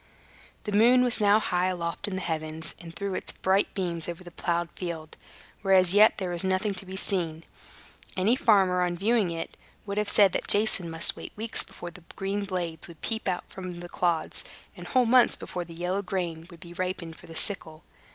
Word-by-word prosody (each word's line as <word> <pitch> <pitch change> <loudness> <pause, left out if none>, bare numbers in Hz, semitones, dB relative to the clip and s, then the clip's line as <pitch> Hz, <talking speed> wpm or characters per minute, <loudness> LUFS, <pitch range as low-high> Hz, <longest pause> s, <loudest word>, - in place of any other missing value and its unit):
The 210 - -4
moon 240 +5 +6
was 240 -3 +3
now 205 +1 +5
high 180 -3 0
aloft 175 +2 -2
in 195 - -3
the 190 - -3
heavens, 160 -1 -3
and 170 -1 -9
threw 195 +4 -4
its - - -3
bright 190 +2 +1
beams 175 -4 -2
over 175 +1 -6
the 175 - -11
plowed 170 0 -1
field, 165 -3 -6 0.5
where 195 -2 +4
as 185 -1 +5
yet 210 +2 +6
there 185 -3 -3
was 175 0 -2
nothing 190 +2 0
to 190 0 -7
be 190 - -6
seen. 170 -5 -1 0.7
Any 205 +6 +3
farmer, 195 -7 +4
on 175 -1 0
viewing 210 0 +2
it, 165 -1 -5 0.3
would 200 0 -2
have 210 - +1
said 200 -3 +6
that - - -2
Jason 205 -4 +4
must 165 0 +1
wait - - -9
weeks 225 +2 -2
before 175 - -9
the 180 - -14
green 200 +1 -2
blades 175 -4 -3
would 170 -2 -14
peep 220 -3 -1 0.2
from 190 -2 -9
among 175 -1 -6
the 175 - -7
clods, 170 -3 0 0.3
and - - -9
whole 255 -2 +3
months 245 +1 +5
before 175 -1 -5
the 165 0 -11
yellow 180 +3 -1
grain 175 -4 -3
would 170 -3 -14
be 175 0 -10
ripened 180 -2 -4
for - - -15
the 165 - -10
sickle. 160 -4 -3
185 Hz, 210 wpm, -27 LUFS, 170-200 Hz, 0.7 s, moon